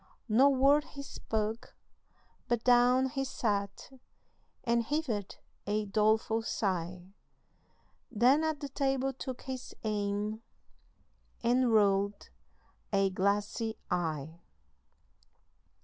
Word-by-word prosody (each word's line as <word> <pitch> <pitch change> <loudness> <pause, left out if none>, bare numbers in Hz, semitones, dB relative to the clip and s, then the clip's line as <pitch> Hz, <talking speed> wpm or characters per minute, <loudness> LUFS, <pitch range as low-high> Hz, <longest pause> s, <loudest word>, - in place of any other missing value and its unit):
No 250 +5 +5
word 280 +2 +4
he 280 - -6
spake, 220 -4 -3 0.8
but 240 -1 0
down 250 +1 +4
he 270 +1 -2
sat, 205 -5 -2 0.7
And 235 0 +2
heaved 230 -6 -2 0.4
a 210 +1 0
doleful 220 +2 +2
sigh, 185 -4 -3 1.0
Then 250 +7 +4
at 315 -2 -1
the 285 - -4
table 270 -1 0
took 260 -1 -7
his 260 -1 -7
aim 210 0 -2 1.0
And 245 +1 +3
rolled 200 -1 +2 0.6
a 195 -1 +2
glassy 205 +4 -1
eye. 160 -1 -2
220 Hz, 95 wpm, -31 LUFS, 200-260 Hz, 1.0 s, No